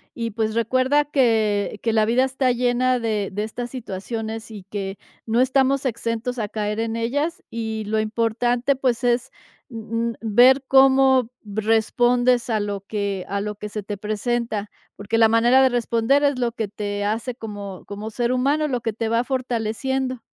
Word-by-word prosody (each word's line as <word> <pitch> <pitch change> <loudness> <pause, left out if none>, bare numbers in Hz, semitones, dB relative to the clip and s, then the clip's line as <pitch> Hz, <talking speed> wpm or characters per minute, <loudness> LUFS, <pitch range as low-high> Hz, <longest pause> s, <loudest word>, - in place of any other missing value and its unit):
y 230 -1 -3
pues 220 0 -1
recuerda 255 +5 +2
que 220 -7 +1
que 225 - 0
la 220 -1 +3
vida 240 +4 +3
está 265 -1 +1
llena 250 +1 +1
de 215 -3 -1
de 205 +2 -2
estas 240 +3 -5
situaciones 225 -1 -5
y 205 -3 -9
que 195 -1 -4 0.3
no 225 +1 +1
estamos 270 +1 +2
exentos 235 +1 -2
a 210 -3 -2
caer 210 0 -2
en 225 0 -2
ellas. 290 +9 -1
Y 220 -2 -4
lo 215 +1 0
importante, 235 +4 0
pues, 255 -3 0
es, 245 +2 +1 0.4
mm 230 0 -3
mm, - - -4
ver 245 +5 +5
cómo 265 -2 +5 0.2
respondes 240 +4 +2
a 220 -1 +1
lo 205 -1 -3
que 200 -2 -3
a 200 - -1
lo 210 +1 -4
que 210 +1 -7
se 210 0 -4
te 205 0 -5
presenta, 215 0 -2 0.3
porque 215 +3 -2
la 225 -1 +6
manera 240 +4 +5
de 260 - +5
responder 240 +3 +1
es 285 -2 +2
lo 240 -1 0
que 225 -2 -3
te 205 0 -4
hace 225 +4 -2
como 205 -5 -8
como 205 +2 -6
ser 240 +2 -1
humano, 285 +4 +1
lo 250 -4 -2
que 225 - -1
te 225 +1 -3
va 230 +1 +2
fortaleciendo. 255 0 -2
230 Hz, 175 wpm, -22 LUFS, 215-255 Hz, 0.4 s, la